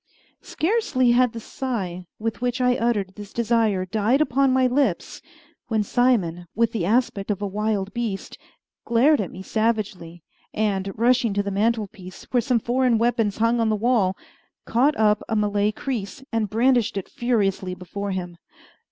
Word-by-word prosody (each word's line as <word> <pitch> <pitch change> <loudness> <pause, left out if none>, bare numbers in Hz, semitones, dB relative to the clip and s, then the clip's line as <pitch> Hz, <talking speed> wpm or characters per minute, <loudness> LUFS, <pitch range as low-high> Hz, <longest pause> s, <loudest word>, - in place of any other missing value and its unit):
Scarcely 310 - +1
had 250 0 +4
the 230 - -7
sigh 195 -8 -4
with 225 +1 -4
which 250 0 -1
I 250 0 +3
uttered 215 -6 0
this 205 0 -10
desire 225 -5 +1
died 215 +7 +1
upon 275 -2 +2
my 260 0 +3
lips 250 -7 0 0.5
when 220 -2 +1
Simon, 195 -8 +1
with 230 +1 +2
the 185 -7 -2
aspect 215 -3 0
of 205 -2 -1
a 205 - -3
wild 205 0 -2
beast, 225 -5 -4 0.4
glared 245 +4 +3
at 190 - -4
me 185 - -9
savagely, 200 -7 -2 0.3
and, 200 -2 0
rushing 240 -2 +2
to 205 - +1
the 200 - -3
mantelpiece, 205 -3 -2
where 245 - +3
some 250 +1 +1
foreign 245 +1 +1
weapons 230 -3 +1
hung 230 +2 +2
on 225 -1 +2
the 215 - +2
wall, 210 -4 +1 0.5
caught 270 +6 +2
up 210 -1 +3
a 220 - 0
Malay 210 0 +1
creese, 240 +1 -5
and 225 -3 0
brandished 235 -1 +2
it 195 - -4
furiously 195 -6 -1
before 200 +3 -6
him. 180 -2 -4
220 Hz, 160 wpm, -23 LUFS, 200-245 Hz, 0.5 s, had